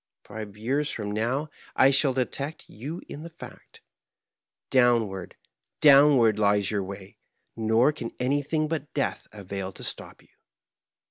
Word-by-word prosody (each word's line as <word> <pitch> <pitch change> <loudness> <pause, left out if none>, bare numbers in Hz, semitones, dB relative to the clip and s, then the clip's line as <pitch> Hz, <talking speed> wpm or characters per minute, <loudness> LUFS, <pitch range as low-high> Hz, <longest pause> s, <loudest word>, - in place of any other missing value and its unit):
Five 105 -1 -8
years 135 +7 -1
from 105 -2 -4
now 125 +8 -1 0.2
I 135 - +6
shall 135 0 +3
detect 135 +4 -3
you 145 - -7
in 145 - -8
the 165 - -8
fact. 165 - -13 0.9
Downward, 115 -7 +2 0.4
downward, 135 -7 +6
lies 100 -1 +2
your 100 -2 -1
way; 95 0 -10 0.4
nor 115 +5 +3
can 120 -6 -6
anytlung 145 +4 0
but 150 -2 -5
death - - -2
avail 100 -2 -6
to - - -11
stop - - -6
you." - - -27
120 Hz, 135 wpm, -26 LUFS, 105-145 Hz, 0.9 s, I